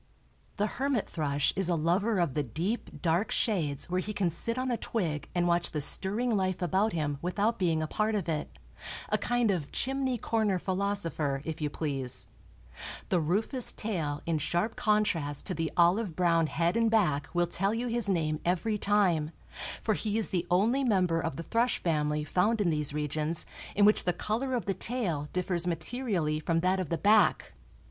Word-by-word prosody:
The 205 - +2
hermit 260 +1 -1
thrush 145 -3 0
is 190 -2 +2
a 175 - +2
lover 185 +7 +1
of 170 -7 +1
the 150 - 0
deep, 165 - -4
dark 170 +5 +1
shades 155 - -1
where 180 +1 0
he 210 +3 -4
can 190 -4 0
sit 230 +8 0
on 255 0 -1
a - - +2
twig 165 -13 -3
and 175 0 +2
watch 175 0 +2
the 150 - -3
stirring 210 - +3
life 185 -2 0
about 190 +5 +1
him 145 -4 -2
without 205 +6 0
being 165 -4 +1
a - - -2
part 215 +5 0
of 195 -5 -2
it—a 155 -2 -5
kind 245 -3 +1
of 165 -7 -3
chimney 265 -1 -1
corner 220 -4 0
philosopher, 180 -7 -1
if 160 -1 -5
you 150 - 0
please. 130 - -2 0.8
The 180 - +3
rufous 210 - +1
tail 160 -9 -3
in 165 -2 0
sharp 175 +9 -1
contrast 185 -10 +1
to - - -2
the 165 0 -2
olive 175 +1 +3
brown 170 -2 +3
head 170 +4 0
and 230 -1 +3
back 180 -11 +1
will 175 0 +3
tell 190 +3 0
you 240 +2 -2
his 235 -3 -1
name 155 -5 0
every 185 +5 0
time, 185 -8 +2 0.5
for 220 - +2
he 210 +1 -1
is 225 - +2
the 180 -2 -1
only 225 +10 +2
member 185 -8 +2
of 160 -4 -3
the 165 - -5
thrush 230 +6 +1
family 150 -2 0
found 205 +9 +1
in 185 -5 +2
these 150 -2 +1
regions 150 +2 -2 0.3
in 205 - +5
which 210 - +4
the 180 - +2
color 240 +8 -2
of 240 - -2
the 195 - 0
tail 185 - -2
differs 180 -1 -1
materially 170 -3 -1
from 165 +1 0
that 185 +2 +2
of 180 -5 -3
the 170 - 0
back. 205 - +3
180 Hz, 185 wpm, -29 LUFS, 160-215 Hz, 0.8 s, in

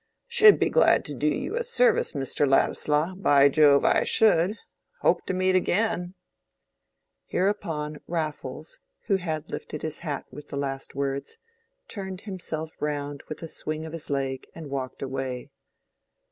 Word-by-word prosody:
"Should 435 -3 +7
be - - +1
glad - - +4
to 145 - -5
do 145 +3 -1
you 325 - -1
a 480 - 0
service, 475 0 +2
Mr. 140 0 0
Ladislaw—by 150 +1 +3
Jove, 145 -1 +5
I - - +4
should! 205 -1 +3 0.4
Hope - - +3
to - - -1
meet 185 0 +2
again." 185 -1 0 1.1
Hereupon 160 -6 -1
Raffles, 155 -3 -4 0.3
who 200 -3 +2
had 160 -4 -4
lifted 150 - -6
his 155 -1 -2
hat 150 -5 -4
with 150 - -10
the 140 - -6
last 135 -1 -4
words, 140 - -3 0.5
turned 190 -2 -6
himself 160 -6 -4
round 145 -1 -3
with 155 - -6
a - - -4
swing 155 0 -4
of 160 - -8
his 165 -2 -3
leg 135 -2 -2
and 155 -4 -8
walked 130 -1 -4
away. 130 -2 -4
155 Hz, 145 wpm, -26 LUFS, 140-185 Hz, 1.1 s, Should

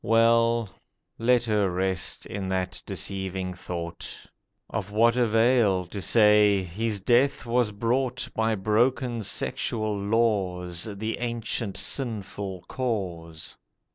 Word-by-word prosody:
Well, 115 0 +3 0.5
let 120 +1 +3
her 105 -4 +1
rest 95 +2 -2
in 100 -2 -5
that 95 -1 -2
deceiving 95 -1 -3
thought, 85 -1 -6 0.6
Of 100 - -4
what 115 +3 +3
avail 115 -5 +3
to 100 +3 -7
say, 105 -2 +5
'His 105 +3 -2
death 125 +7 +2
was 120 -2 +1
brought 125 +4 -1
By 110 0 +1
broken 120 +4 +1
sexual 110 +1 -1
laws, 100 -5 0
The 110 +2 -4
ancient 115 -4 -3
sinful 100 -7 -3
cause. 90 -10 -4
105 Hz, 110 wpm, -26 LUFS, 95-115 Hz, 0.6 s, say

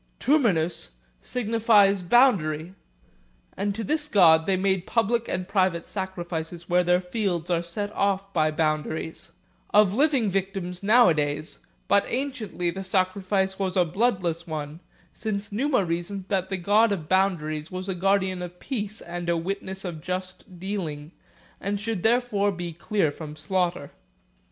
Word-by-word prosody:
Terminus 195 - +1 0.3
signifies 215 -4 +3
boundary, 180 - +3 0.8
and 200 +1 -2
to 225 - -3
this 300 +4 -1
god 165 - +5
they 190 -1 +2
make 190 -1 0
public 230 0 +1
and 180 0 -3
private 185 -4 +1
sacri 190 -3 -4
fices 170 0 -5
where 180 +1 +2
their 180 0 +3
fields 180 -3 -2
are 170 -1 +2
set 205 +5 -4
off 195 0 0
by 155 -2 +3
boundaries; 155 +1 -2 0.4
of 210 -2 +5
living 270 -2 +2
victims 190 -2 -3
nowadays, 155 -9 +3 0.3
but 200 - +4
anciently 240 -9 -2
the 190 +2 -6
sacrifice 190 +1 0
was 190 -1 -1
a 180 - +4
bloodless 175 -3 0
one, 155 -1 -5 0.3
since 210 -1 -4
Numa 250 -1 +1
reasoned 175 +3 -3
that 190 -2 0
the 190 - -2
god 205 +5 +3
of 170 -6 -3
boundaries 160 -5 0
was 185 +1 -6
a 190 - -1
guardian 190 0 +1
of 180 0 -8
peace 215 -5 -4
and 175 0 -5
a 170 - +2
witness 190 +2 -4
of 165 -4 -5
just 185 +1 -6
dealing, 170 -6 -4 0.5
and 200 +1 -2
should 215 -2 -3
therefore 220 -3 +2
be 175 -2 -5
clear 170 -1 0
from 150 0 -8
slaughter. 170 -1 -1
190 Hz, 145 wpm, -25 LUFS, 170-205 Hz, 0.8 s, god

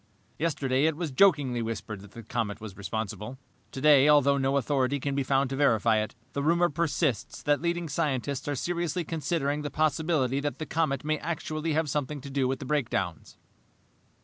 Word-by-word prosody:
"Yesterday 140 -4 +1
it 160 -2 +1
was 165 -4 -3
jokingly 140 -6 +3
whispered 110 -2 -5
that 100 0 -14
the 115 - -9
comet 110 -2 -3
was 105 -3 -8
responsible. 105 +3 -5 0.3
Today, 145 0 +5
although 140 -1 +5
no 135 +1 +1
authority 140 +1 +1
can 140 +1 -2
be 140 - 0
found 135 0 +1
to - - -1
verify 115 -5 +3
it, 110 - -4 0.2
the 140 - -1
rumor 170 +4 +3
persists 155 - -1
that 145 0 +2
leading 170 0 -1
scientists 140 -3 -2
are 145 - -1
seriously 175 +3 -2
considering 150 -2 -1
the 150 - -3
possibility 155 -3 +1
that 145 0 -3
the 155 - -4
comet 155 -6 0
may 155 0 0
actually 160 -1 -3
have 160 +1 +1
something 145 +1 -2
to 140 +1 -9
do 135 -1 +1
with 135 +1 -1
the 135 - -8
breakdowns." 110 - -2
140 Hz, 180 wpm, -28 LUFS, 130-155 Hz, 0.3 s, Today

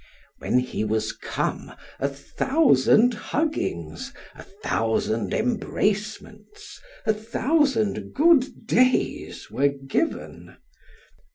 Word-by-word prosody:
When - - +1
he 125 -3 -1
was 110 0 -1
come, - - -4 0.3
a 140 - +1
thousand 240 - +3
huggings, 145 - -3 0.2
a - - -12
thousand 110 +1 -1
embracements, 215 - -3 0.2
a 220 - +3
thousand 230 +1 0
good 290 -6 +3
days 255 +3 +1
were 135 +5 +2
given. 140 - -3
215 Hz, 85 wpm, -24 LUFS, -, 0.3 s, thousand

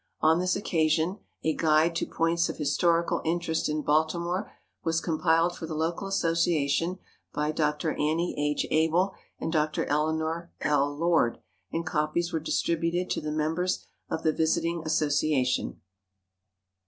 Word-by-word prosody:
On 160 +2 +4
this 180 0 +1
occasion 165 0 +1 0.2
a 160 - +2
Guide 160 +1 +3
to - - -1
Points 165 +1 +1
of - - -5
Historical 170 +3 +1
Interest 165 -1 0
in 150 0 -1
Baltimore 170 +5 0 0.3
was 165 0 +1
compiled 165 +1 +2
for 160 - -6
the 155 - -4
local 165 +5 -1
association 165 -2 +1 0.4
by 150 +1 0
Dr. 155 +1 0
Annie 160 +4 0
H. 150 0 0
Abel 165 +5 +2 0.3
and 160 - -3
Dr. 155 -1 +1
Eleanor 160 +3 -1
L. 145 -1 +2
Lord, 165 -7 +2 0.3
and 165 0 -2
copies 160 +3 -1
were 160 - +1
distributed 170 +3 0
to - - -1
the 155 0 -3
members 160 +4 -1 0.2
of 160 - -3
the 155 - +3
visiting 165 +2 0
association. 150 -4 +1
160 Hz, 140 wpm, -28 LUFS, 155-170 Hz, 0.4 s, On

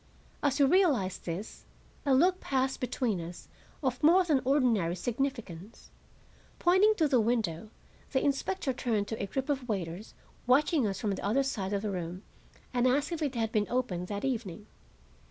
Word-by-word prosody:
As 285 -2 +1
we 280 - +6
realized 275 - +2
this, 175 +5 -6 0.4
a 270 - +5
look 360 +6 +3
passed 265 -1 -1
between 245 -6 -1
us 170 +1 -9 0.4
of 255 -2 -1
more 345 +5 +6
than 300 -6 +2
ordinary 240 - +2
significance. 230 -4 -4 0.7
Pointing 380 +5 +4
to 320 -6 +2
the 260 -5 +3
window, 215 -5 -1 0.4
the 265 - +1
inspector 280 +1 0
turned 220 -5 -1
to 225 - -4
a 200 - -2
group 265 +7 -3
of 270 -4 -2
waiters 190 0 -4 0.3
watching 280 0 +3
us 195 -1 -3
from 210 - -1
the 195 - -4
other 230 +7 +2
side 205 -8 -3
of 200 0 -1
the 210 - -1
room 180 +1 -5 0.5
and 245 0 +2
asked 280 +5 +1
if 335 -2 -3
it 280 -4 -1
had 225 -1 -1
been 210 -2 +1
opened 195 -8 -1
that 205 +3 -4
evening. 215 -8 -3
245 Hz, 175 wpm, -30 LUFS, 200-275 Hz, 0.7 s, we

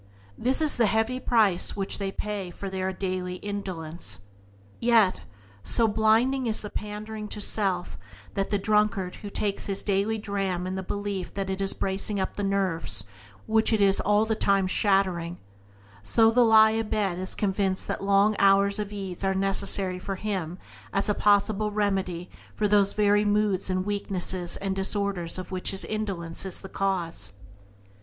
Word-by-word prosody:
This 260 +6 0
is 305 - 0
the 230 -2 +4
heavy 225 +4 0
price 210 -9 +3
which 195 +1 -2
they 200 - -2
have 195 - -6
to - - -2
pay 205 -3 -4
for 195 +2 -7
their 190 0 -2
daily 185 -1 -4
indulgence. 170 - -6 0.6
Yet, 225 -5 +3 0.4
so 230 -2 +2
blinding 225 +5 +2
is 220 - -2
the 210 - -7
pandering 210 +1 -6
to 210 - -6
self 195 -4 -1 0.3
that, 195 - 0
like - - -16
the 205 - +1
drunkard 200 -2 +1
who 205 - -8
takes 200 0 -2
his 195 -1 -3
daily 205 +2 0
dram 195 -4 -2
in 185 - -3
the 190 - -3
belief 200 -1 -4
that 195 -1 -2
it 190 +1 -3
is 195 - +3
bracing 195 +1 -2
up 190 - -2
the - - -4
nerves 185 - +2 0.4
which 220 +1 +2
it 220 - +2
is 195 -1 +3
all 210 +1 +2
the 220 - 0
time 200 -3 +2
shattering, 185 -3 +1 0.6
so 225 - +3
the 245 +2 +4
lie 220 -1 +6
a 225 +1 0
bed 200 -4 -1
is 185 - -4
convinced 195 -2 -1
that - - -3
long 200 +2 +3
hours 200 +1 +4
of 205 -1 -4
ease 195 -3 -6
are 190 0 +1
necessary 195 -1 +2
for 195 +1 -4
him 185 -4 -4 0.3
as 195 +1 0
a - - +3
possible 210 +1 +2
remedy 195 -4 -1 0.3
for 210 - +1
those 200 -1 +4
very 205 0 +3
moods 205 -2 +1
and 185 0 -1
weaknesses 190 -3 0
and 195 -1 -3
disorders 195 -3 +1
of 185 0 -7
which 185 -1 -2
his 195 - +2
indulgence 195 -6 -4
is 190 -2 -4
the 195 - -9
cause. 185 - -2
200 Hz, 180 wpm, -26 LUFS, 190-210 Hz, 0.6 s, lie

